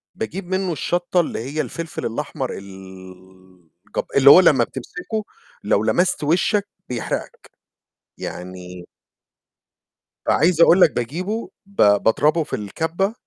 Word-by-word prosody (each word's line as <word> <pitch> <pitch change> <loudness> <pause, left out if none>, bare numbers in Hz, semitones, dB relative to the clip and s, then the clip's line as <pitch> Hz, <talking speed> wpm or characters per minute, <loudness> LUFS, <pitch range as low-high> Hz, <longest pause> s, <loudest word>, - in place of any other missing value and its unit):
باجيب 175 - -5
منه 185 0 -1
الشطّة 175 +4 -1
اللي 170 - -1
هي 140 +6 -3
الفلفل 160 +4 -6
الأحمر 130 +2 -4
ال 95 -2 -14 0.3
جب - - -1
اللي 140 0 +7
هو 180 - +10
لمّا 145 -9 +5
بتمسكه، 180 - -5 0.4
لو - - +1
لمست 180 -3 +1
وشّك 185 +6 +1 0.2
بيحرقك. 120 -3 -5 0.7
يعني 90 0 -8 1.4
فعايز 170 +2 +3
أقول 175 +2 +6
لك 155 - +7
باجيبه 180 - -3 0.2
ب 200 - -23 0.3
باضربه 150 +8 +2
في - - -4
الكبّة 165 - -2
150 Hz, 120 wpm, -21 LUFS, -, 1.4 s, هو